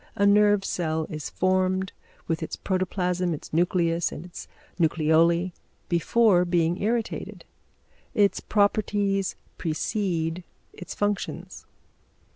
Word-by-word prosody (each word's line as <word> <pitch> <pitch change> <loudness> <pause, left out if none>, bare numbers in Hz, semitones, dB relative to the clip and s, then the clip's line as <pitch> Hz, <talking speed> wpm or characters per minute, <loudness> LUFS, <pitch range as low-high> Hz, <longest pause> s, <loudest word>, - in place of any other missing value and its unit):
A 200 - +2
nerve 205 -1 +4
cell 160 -2 -1
is 155 -2 -5
formed, 185 0 +1 0.4
with 165 0 -1
its 160 - -4
protoplasm, 180 -2 -1
its 150 - -12
nucleus 170 0 +1
and 160 - -8
its 180 - -9 0.3
nucleoli 165 +2 +3 0.4
before 180 +2 +3
being 175 0 +1
irritated; 225 +2 -2 0.7
its 205 -3 +3
properties 205 -2 +1 0.2
precede 170 0 -2 0.3
its 180 - -8
functions. 205 0 -3
180 Hz, 100 wpm, -26 LUFS, 165-200 Hz, 0.7 s, nerve